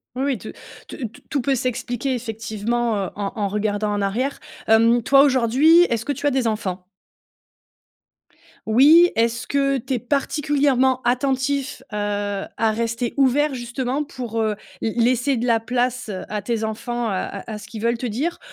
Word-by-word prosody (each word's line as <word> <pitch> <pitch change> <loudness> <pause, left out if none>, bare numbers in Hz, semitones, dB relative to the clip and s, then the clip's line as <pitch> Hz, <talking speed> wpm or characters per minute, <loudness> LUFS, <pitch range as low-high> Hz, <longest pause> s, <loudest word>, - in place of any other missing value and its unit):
Oui, 265 +2 -1
oui. 275 -4 0
Tout 215 - -9 0.4
tout - - -8
t 230 - -18
tout 285 - 0
peut 270 +2 +1
s'expliquer 250 +1 -2
effectivement, 225 0 -2
heu, - - -7
en 200 +1 -3
en 205 -3 -1
regardant 210 +1 -1
en 205 - -1
arrière. 245 +8 -1 0.3
Hem, 230 +2 +5
toi, 275 +4 +6
aujourd'hui, 275 +6 +5
est-ce 230 -6 -1
que 285 - -1
tu 285 - -4
as 290 - +4
des 260 -3 0
enfants? 190 -4 -2 1.8
Oui. 300 +10 +6
Est-ce 230 0 0
que 275 -1 +1
tu 260 +2 -3
es - - 0
particulièrement 275 0 +1
attentif, 270 +2 0
heu, 210 - -4
à 205 +1 -1
rester 230 +1 -2
ouvert 280 +2 +3
justement 250 +3 -3
pour, 240 -5 -5
heu, 215 -1 +1 0.3
lai 225 - -2 0.2
laisser 255 +2 0
de 240 +2 -2
la 230 -1 +3
place 245 0 -1 0.2
à 210 -1 -3
tes 225 +1 -2
enfants, 230 +2 -3
à 195 0 -3
à 215 - -5
ce 210 - -11
qu'ils 215 0 -8
veulent 235 0 +1
te 250 - -3
dire? 280 +11 -2
240 Hz, 170 wpm, -22 LUFS, 220-270 Hz, 1.8 s, toi